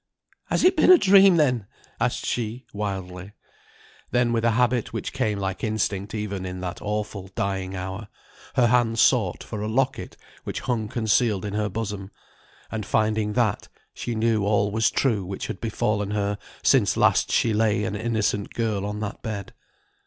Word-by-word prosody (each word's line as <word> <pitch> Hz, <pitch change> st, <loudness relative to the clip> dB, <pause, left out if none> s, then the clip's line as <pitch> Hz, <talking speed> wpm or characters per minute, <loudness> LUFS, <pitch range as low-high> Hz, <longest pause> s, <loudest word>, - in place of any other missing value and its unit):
"Has -, -, 0 dB
it 370 Hz, +1 st, +5 dB
been -, -, +6 dB
a 365 Hz, -, +10 dB
dream 195 Hz, -, +6 dB
then?" 125 Hz, -9 st, +2 dB, 0.3 s
asked -, -, -1 dB
she 120 Hz, +1 st, -3 dB
wildly. 95 Hz, -2 st, -5 dB, 0.8 s
Then 120 Hz, -1 st, +2 dB
with 115 Hz, -1 st, 0 dB
a 115 Hz, -, +4 dB
habit, 125 Hz, -1 st, +1 dB
which -, -, -4 dB
came 105 Hz, -1 st, 0 dB
like 95 Hz, -1 st, -3 dB
instinct 105 Hz, -2 st, -1 dB
even 100 Hz, -3 st, -3 dB
in 90 Hz, 0 st, -5 dB
that 90 Hz, -1 st, -5 dB
awful 105 Hz, -2 st, -3 dB
dying 95 Hz, -1 st, -2 dB
hour, 95 Hz, +3 st, -5 dB, 0.5 s
her 125 Hz, -, +4 dB
hand 120 Hz, -1 st, +2 dB
sought 110 Hz, -8 st, +3 dB
for 105 Hz, -2 st, -6 dB
a 105 Hz, -, -2 dB
locket 130 Hz, +4 st, -1 dB, 0.3 s
which -, -, -4 dB
hung 115 Hz, -4 st, -1 dB
concealed 110 Hz, -2 st, +1 dB
in 100 Hz, -, -4 dB
her 105 Hz, 0 st, 0 dB
bosom, 105 Hz, -3 st, -4 dB, 0.6 s
and, 110 Hz, -1 st, -3 dB
finding 110 Hz, 0 st, 0 dB
that, 115 Hz, -4 st, 0 dB, 0.3 s
she 120 Hz, -, -4 dB
knew 110 Hz, -1 st, +1 dB
all 100 Hz, 0 st, +2 dB
was 110 Hz, +1 st, +2 dB
true 110 Hz, -8 st, +1 dB
which 95 Hz, +1 st, -5 dB
had 95 Hz, -, -6 dB
befallen 105 Hz, -2 st, -1 dB
her 100 Hz, -1 st, -1 dB, 0.2 s
since -, -, +3 dB
last -, -, +3 dB
she 115 Hz, -, +2 dB
lay 105 Hz, 0 st, +2 dB
an 105 Hz, -, -2 dB
innocent 110 Hz, -2 st, -1 dB
girl 105 Hz, -4 st, -1 dB
on 105 Hz, +1 st, -4 dB
that 105 Hz, -1 st, -5 dB
bed. 105 Hz, -3 st, -5 dB
105 Hz, 170 wpm, -24 LUFS, 100-115 Hz, 0.8 s, a